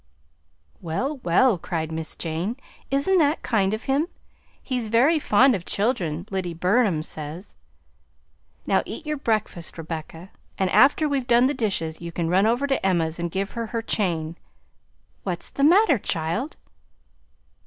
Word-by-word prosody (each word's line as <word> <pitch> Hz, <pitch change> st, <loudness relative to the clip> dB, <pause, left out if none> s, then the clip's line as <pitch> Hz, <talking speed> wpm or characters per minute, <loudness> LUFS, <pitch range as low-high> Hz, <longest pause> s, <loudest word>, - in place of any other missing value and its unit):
"Well, 255 Hz, -, -2 dB
well!" 210 Hz, 0 st, +3 dB
cried 160 Hz, -1 st, -3 dB
Miss 160 Hz, 0 st, -4 dB
Jane, 170 Hz, +8 st, -3 dB, 0.3 s
"isn't 285 Hz, +8 st, +2 dB
that 300 Hz, 0 st, +2 dB
kind 200 Hz, -5 st, +1 dB
of 220 Hz, +2 st, -3 dB
him? 280 Hz, +5 st, +1 dB, 0.6 s
He's 250 Hz, -4 st, -2 dB
very 260 Hz, +9 st, +4 dB
fond 260 Hz, 0 st, +4 dB
of 190 Hz, -6 st, -2 dB
children, 180 Hz, -, -1 dB
Lyddy 180 Hz, -3 st, -2 dB
Burnham 185 Hz, -2 st, +2 dB
says. 155 Hz, +4 st, -8 dB, 1.1 s
Now -, -, +3 dB
eat -, -, -7 dB
your 300 Hz, 0 st, -2 dB
breakfast, 215 Hz, -10 st, -2 dB
Rebecca, 165 Hz, +2 st, -7 dB, 0.3 s
and 190 Hz, -1 st, 0 dB
after 290 Hz, +3 st, +5 dB
we've 275 Hz, -4 st, -1 dB
done 240 Hz, 0 st, +5 dB
the 275 Hz, -, +2 dB
dishes 170 Hz, -, -2 dB
you 170 Hz, 0 st, -6 dB
can 165 Hz, -1 st, -2 dB
run 190 Hz, +4 st, +4 dB
over 240 Hz, +5 st, +1 dB
to 270 Hz, -2 st, 0 dB
Emma's 170 Hz, -3 st, +1 dB
and 170 Hz, 0 st, -2 dB
give 195 Hz, +3 st, -3 dB
her 230 Hz, -1 st, -4 dB
her 230 Hz, +1 st, -3 dB
chain 170 Hz, -7 st, -1 dB, 0.8 s
What's -, -, -4 dB
the 280 Hz, -, -2 dB
matter, 335 Hz, -, +5 dB
child?" 170 Hz, -, -3 dB
205 Hz, 150 wpm, -24 LUFS, 170-260 Hz, 1.1 s, after